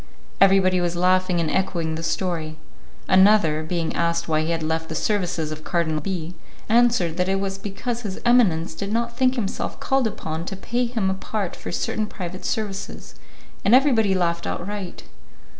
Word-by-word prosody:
Everybody 190 Hz, -2 st, +5 dB
was 175 Hz, 0 st, -1 dB
laughing 185 Hz, 0 st, +2 dB
and 165 Hz, -2 st, 0 dB
echoing 175 Hz, -4 st, -1 dB
the 160 Hz, -, -4 dB
story. 165 Hz, -3 st, -2 dB, 0.5 s
Another, 185 Hz, -5 st, +5 dB
being 165 Hz, +1 st, -2 dB
asked 170 Hz, 0 st, 0 dB
why 155 Hz, -1 st, +2 dB
he 155 Hz, -, -2 dB
had 165 Hz, -1 st, -1 dB
left 160 Hz, +1 st, -2 dB
the 160 Hz, -, -4 dB
services 175 Hz, -6 st, -1 dB
of 155 Hz, 0 st, -7 dB
Cardinal 160 Hz, -3 st, 0 dB
B., 175 Hz, -1 st, -4 dB, 0.3 s
answered 230 Hz, -8 st, +3 dB
that 180 Hz, +1 st, +1 dB
it 195 Hz, 0 st, +1 dB
was 195 Hz, 0 st, -3 dB
because 230 Hz, +4 st, -4 dB
his 200 Hz, -5 st, -5 dB
eminence 195 Hz, -10 st, +3 dB
did 200 Hz, +5 st, -5 dB
not 235 Hz, +1 st, -1 dB
think 255 Hz, +1 st, +2 dB
himself 210 Hz, -6 st, -3 dB
called 270 Hz, -3 st, +1 dB
upon 160 Hz, -5 st, -5 dB
to 195 Hz, -, -5 dB
pay 240 Hz, +6 st, -1 dB
him 225 Hz, -5 st, -1 dB
apart 195 Hz, 0 st, -3 dB
for -, -, -7 dB
certain 215 Hz, +4 st, -1 dB
private 185 Hz, -2 st, -7 dB
services, 205 Hz, -3 st, -4 dB, 0.5 s
and 205 Hz, +5 st, +6 dB
everybody 230 Hz, -8 st, +4 dB
laughed 170 Hz, -2 st, 0 dB
outright. 195 Hz, 0 st, -5 dB
185 Hz, 170 wpm, -23 LUFS, 170-210 Hz, 0.5 s, and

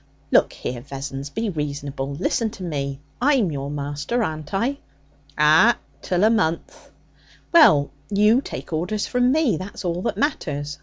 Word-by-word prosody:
'Look -, -, +4 dB
here, 120 Hz, -1 st, -5 dB
Vessons! 135 Hz, +1 st, -6 dB
Be 220 Hz, +6 st, -2 dB
reasonable. 140 Hz, -3 st, -4 dB
Listen 220 Hz, +7 st, 0 dB
to 190 Hz, -, -8 dB
me. 140 Hz, -5 st, -3 dB, 0.2 s
I'm 255 Hz, -, +3 dB
your 140 Hz, -1 st, -4 dB
master, 145 Hz, +11 st, -2 dB
aren't 155 Hz, -4 st, -4 dB
I?' 245 Hz, +8 st, -1 dB, 0.6 s
'Ah! 155 Hz, +10 st, +5 dB, 0.2 s
Till 180 Hz, +1 st, 0 dB
a 215 Hz, -, +6 dB
month.' 170 Hz, -8 st, -1 dB, 0.6 s
'Well, 155 Hz, -, +6 dB, 0.2 s
you 210 Hz, +5 st, +4 dB
take -, -, -7 dB
orders 180 Hz, +6 st, -1 dB
from 250 Hz, 0 st, +2 dB
me; 280 Hz, -, +2 dB
that's 185 Hz, +2 st, -7 dB
all 175 Hz, 0 st, -1 dB
that 190 Hz, -, -2 dB
matters. 150 Hz, -, -2 dB
165 Hz, 150 wpm, -22 LUFS, 145-220 Hz, 0.6 s, a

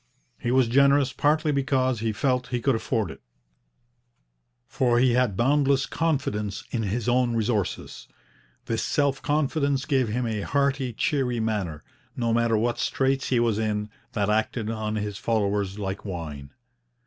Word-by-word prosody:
He -, -, -2 dB
was 130 Hz, -1 st, +4 dB
generous 140 Hz, +2 st, +4 dB
partly 150 Hz, +2 st, +2 dB
because 130 Hz, -3 st, +1 dB
he 110 Hz, 0 st, 0 dB
felt 125 Hz, +3 st, 0 dB
he 125 Hz, -, -2 dB
could 135 Hz, +3 st, +2 dB
afford 110 Hz, -1 st, -1 dB
it, -, -, -12 dB, 1.5 s
for 120 Hz, -2 st, +1 dB
he 125 Hz, 0 st, +4 dB
had 120 Hz, -6 st, +1 dB
boundless 140 Hz, +1 st, +3 dB
confidence 105 Hz, -11 st, -1 dB
in 120 Hz, -, -1 dB
his 110 Hz, +3 st, -2 dB
own 120 Hz, -1 st, +2 dB
resources. 110 Hz, -4 st, -2 dB, 0.6 s
This 115 Hz, -1 st, -1 dB
self 140 Hz, -2 st, 0 dB
confidence 140 Hz, -1 st, 0 dB
gave 135 Hz, -5 st, +1 dB
him 120 Hz, +3 st, -1 dB
a 110 Hz, -2 st, -2 dB
hearty, 140 Hz, 0 st, 0 dB
cheery 130 Hz, -2 st, 0 dB
manner, 100 Hz, -9 st, -2 dB, 0.3 s
no 115 Hz, -2 st, 0 dB
matter 115 Hz, -1 st, +2 dB
what 120 Hz, +2 st, 0 dB
straits 135 Hz, 0 st, 0 dB
he 125 Hz, -, +2 dB
was 115 Hz, -3 st, +1 dB
in, 105 Hz, -1 st, -2 dB, 0.2 s
that 105 Hz, -5 st, 0 dB
acted 110 Hz, +1 st, 0 dB
on 110 Hz, -1 st, -3 dB
his 105 Hz, -2 st, -3 dB
followers 100 Hz, -3 st, 0 dB
like 100 Hz, -1 st, -4 dB
wine. 80 Hz, -8 st, -6 dB
120 Hz, 150 wpm, -25 LUFS, 105-135 Hz, 1.5 s, was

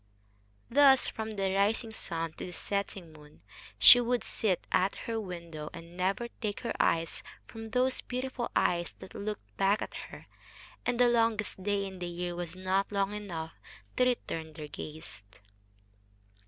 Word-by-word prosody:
Thus, 270 Hz, 0 st, +6 dB
from 220 Hz, -1 st, -4 dB
the 195 Hz, -3 st, -1 dB
rising 215 Hz, +4 st, +2 dB
sun 165 Hz, -6 st, -4 dB
to -, -, -6 dB
the 180 Hz, -, -8 dB
setting 195 Hz, -5 st, -3 dB
moon, 150 Hz, -, -16 dB, 0.3 s
she 245 Hz, -, +10 dB
would 245 Hz, 0 st, +1 dB
sit 195 Hz, -5 st, 0 dB
at 190 Hz, +2 st, +3 dB
her 225 Hz, -1 st, -1 dB
window, 170 Hz, -5 st, -6 dB
and 170 Hz, +1 st, -10 dB
never 195 Hz, +6 st, 0 dB
take 210 Hz, -3 st, -2 dB
her 235 Hz, -, -2 dB
eyes 165 Hz, 0 st, +2 dB, 0.2 s
from 225 Hz, -1 st, -8 dB
those 255 Hz, +3 st, +1 dB
beautiful 255 Hz, -1 st, -3 dB
eyes 175 Hz, -1 st, +2 dB
that -, -, -11 dB
looked 200 Hz, -, -5 dB
back 195 Hz, +2 st, +3 dB
at -, -, -5 dB, 0.2 s
her, -, -, -11 dB, 0.6 s
and 245 Hz, 0 st, +1 dB
the 245 Hz, -, +7 dB
longest 225 Hz, -4 st, +1 dB
day 200 Hz, 0 st, 0 dB
in 190 Hz, -1 st, -7 dB
the 175 Hz, -, -3 dB
year 175 Hz, 0 st, -3 dB
was 175 Hz, -1 st, -4 dB
not 190 Hz, +2 st, 0 dB
long 200 Hz, 0 st, +1 dB
enough 170 Hz, -6 st, -5 dB, 0.4 s
to 250 Hz, -, +5 dB
return 165 Hz, -10 st, -1 dB
their 150 Hz, -1 st, -7 dB
gaze. 155 Hz, -7 st, -8 dB
195 Hz, 160 wpm, -31 LUFS, 170-225 Hz, 0.6 s, she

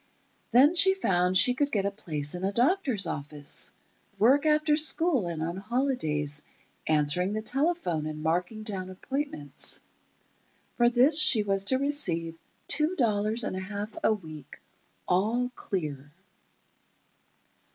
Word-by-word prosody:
Then 265 Hz, +7 st, +5 dB
she 380 Hz, +2 st, +5 dB
found 180 Hz, -, +1 dB
she 250 Hz, -, +5 dB
could 285 Hz, +2 st, -1 dB
get 200 Hz, -3 st, 0 dB
a 200 Hz, -, 0 dB
place 150 Hz, -7 st, -4 dB
in 180 Hz, +1 st, -6 dB
a 195 Hz, -, 0 dB
doctor's 255 Hz, -, +2 dB
office—work 155 Hz, -, -2 dB
after 305 Hz, 0 st, +3 dB
school 310 Hz, -, +2 dB
and 165 Hz, -2 st, -4 dB
on 170 Hz, +2 st, -4 dB
holidays—answering 160 Hz, -, -2 dB
the 215 Hz, 0 st, -3 dB
telephone 265 Hz, -, -1 dB
and 155 Hz, 0 st, -6 dB
marking 180 Hz, +7 st, -1 dB
down 190 Hz, -4 st, -4 dB
appointments. 185 Hz, -, -5 dB, 1.0 s
For 240 Hz, 0 st, +4 dB
this 260 Hz, +6 st, +4 dB
she 220 Hz, -7 st, +5 dB
was 195 Hz, -1 st, -1 dB
to 260 Hz, +5 st, +2 dB
receive 180 Hz, -, -1 dB, 0.3 s
two 310 Hz, +4 st, 0 dB
dollars 220 Hz, -, +1 dB
and 185 Hz, -, -3 dB
a -, -, -3 dB
half 205 Hz, +3 st, -6 dB
a -, -, +4 dB
week—all 195 Hz, -, -4 dB
clear. 150 Hz, -9 st, -5 dB
205 Hz, 125 wpm, -28 LUFS, 170-265 Hz, 1.0 s, Then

